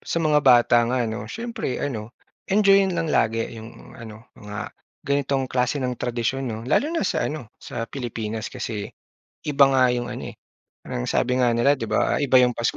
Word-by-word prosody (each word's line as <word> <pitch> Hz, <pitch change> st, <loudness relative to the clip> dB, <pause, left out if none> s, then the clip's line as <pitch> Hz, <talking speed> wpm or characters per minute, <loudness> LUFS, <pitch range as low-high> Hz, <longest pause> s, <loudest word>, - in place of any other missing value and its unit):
sa -, -, -4 dB
mga 155 Hz, -3 st, +3 dB
bata 120 Hz, -4 st, +5 dB
nga 125 Hz, 0 st, +1 dB
ano, 110 Hz, -1 st, -5 dB
siyempre 230 Hz, -, -4 dB
ano, 115 Hz, -4 st, -5 dB, 0.3 s
enjoy-yin 195 Hz, -2 st, +4 dB
lang 165 Hz, -2 st, -1 dB
lagi 115 Hz, +1 st, +2 dB
'yong 115 Hz, +1 st, -11 dB
ano, 115 Hz, -2 st, -12 dB
mga 105 Hz, 0 st, -7 dB, 0.3 s
ganitong 140 Hz, -1 st, 0 dB
klase 125 Hz, +2 st, 0 dB
ng 130 Hz, -3 st, -1 dB
tradisyon, 125 Hz, +2 st, -2 dB
'no? 110 Hz, -1 st, -4 dB
Lalo 260 Hz, -, +2 dB
na 330 Hz, 0 st, -1 dB
sa -, -, 0 dB
ano, 130 Hz, -8 st, -7 dB
sa 115 Hz, -, -5 dB
Pilipinas 115 Hz, -3 st, -5 dB
kasi, 105 Hz, -3 st, -5 dB, 0.6 s
iba 145 Hz, -1 st, +6 dB
nga 130 Hz, -1 st, +4 dB
'yong 120 Hz, 0 st, -2 dB
ano -, -, -6 dB
eh. -, -, -11 dB, 0.5 s
Ang -, -, -4 dB
sabi 125 Hz, +1 st, +1 dB
nga 120 Hz, -2 st, +3 dB
nila 120 Hz, +4 st, +4 dB
'di 145 Hz, -, -3 dB
ba, -, -, +1 dB
ah, -, -, -4 dB
iba 140 Hz, -2 st, +3 dB
'yong 125 Hz, -1 st, +5 dB
Pasko 115 Hz, -1 st, -1 dB
125 Hz, 190 wpm, -23 LUFS, 115-140 Hz, 0.6 s, iba